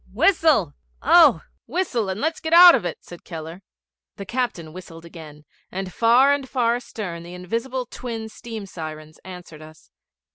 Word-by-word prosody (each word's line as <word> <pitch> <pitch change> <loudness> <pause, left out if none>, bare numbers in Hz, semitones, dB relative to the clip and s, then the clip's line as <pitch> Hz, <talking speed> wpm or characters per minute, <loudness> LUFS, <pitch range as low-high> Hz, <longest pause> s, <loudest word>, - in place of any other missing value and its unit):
'Whistle, 315 - +2 0.3
oh! - - +5 0.2
whistle, 245 - -2
and 190 +2 -4
let's 320 +5 -2
get 320 0 -3
out 350 0 +10
of 230 - 0
it,' 170 - -5
said 175 - -13
Keller. 165 +1 -9 0.5
The 200 - -8
captain 190 -9 -4
whistled 170 -2 -11
again, 155 -3 -13 0.3
and 190 -1 -6
far 245 +5 +4
and 275 -2 -4
far 235 -3 +1
astern 200 -8 -7
the 175 +1 -10
invisible 230 +8 -4
twin 230 -2 -7
steam 220 -1 -9
sirens 155 -4 -9
answered 180 -4 -11
us. 155 0 -16
195 Hz, 155 wpm, -22 LUFS, 170-245 Hz, 0.5 s, out